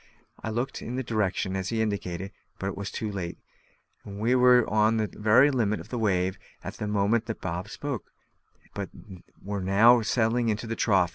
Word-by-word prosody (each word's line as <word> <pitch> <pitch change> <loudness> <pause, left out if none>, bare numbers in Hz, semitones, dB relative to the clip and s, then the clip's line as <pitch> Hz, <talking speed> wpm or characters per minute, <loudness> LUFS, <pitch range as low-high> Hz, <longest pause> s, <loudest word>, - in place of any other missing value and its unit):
I - - -2
looked 120 +5 -3
in 120 - -5
the 130 - -2
direction 100 -4 -1
he 95 +4 -2
indicated, 100 -3 -2 0.3
but 95 0 -3
was 100 0 -5
too 110 -2 -4
late: 90 -4 -5 0.7
we 105 +4 -1
were 125 -1 +5
on 110 +1 +3
the 110 - +1
very 110 +7 +4
summit 110 -5 0
of - - -11
a - - -1
wave 95 -3 0 0.2
at - - -5
the 105 - -3
moment 105 +3 +1
that 110 - -4
Bob 90 +2 -4
spoke, 140 -3 -5 0.6
but - - -4 0.5
were 100 0 -3
now 110 +6 +5
settling 115 +1 +1
into 110 +2 -2
the 115 0 -3
trough. 95 -6 +3
105 Hz, 180 wpm, -27 LUFS, 100-115 Hz, 0.7 s, were